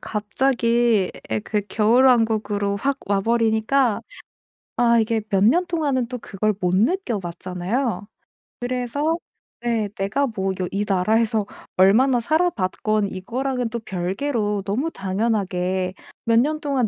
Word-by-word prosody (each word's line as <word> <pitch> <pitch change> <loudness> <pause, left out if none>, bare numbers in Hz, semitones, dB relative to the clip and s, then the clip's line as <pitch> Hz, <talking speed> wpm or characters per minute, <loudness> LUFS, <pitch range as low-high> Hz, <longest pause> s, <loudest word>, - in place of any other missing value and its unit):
갑자기 230 -1 +1 0.2
예 110 -1 0
그 210 - -1
겨울왕국으로 220 -3 +3
확 275 +6 -1
와 200 0 +1
버리니까 230 +2 +2 0.8
아 235 -1 +4
이게 220 0 +1
몇 195 0 +2
년 340 +12 +4
동안은 285 -8 0
또 250 - -5
그걸 215 +1 -1
못 180 -1 +1
느껴 240 - +1
봤잖아요. 185 +6 -3 0.5
그래서 255 +6 -1 0.5
예 225 -3 0
내가 210 +9 0
뭐 195 -5 -2
여 180 - -1
이 205 +1 -1
나라에서 215 +3 +2 0.3
얼마나 240 +7 +5
살아봤건 215 - 0
이거랑은 245 +6 -3
또 235 +1 -4
별개로 205 +2 -2
너무 250 +11 -1
당연하게 190 - -1 0.3
몇 230 0 +4
년 305 +4 +1
동안 275 -6 0
220 Hz, 260 characters per minute, -22 LUFS, 200-250 Hz, 0.8 s, 얼마나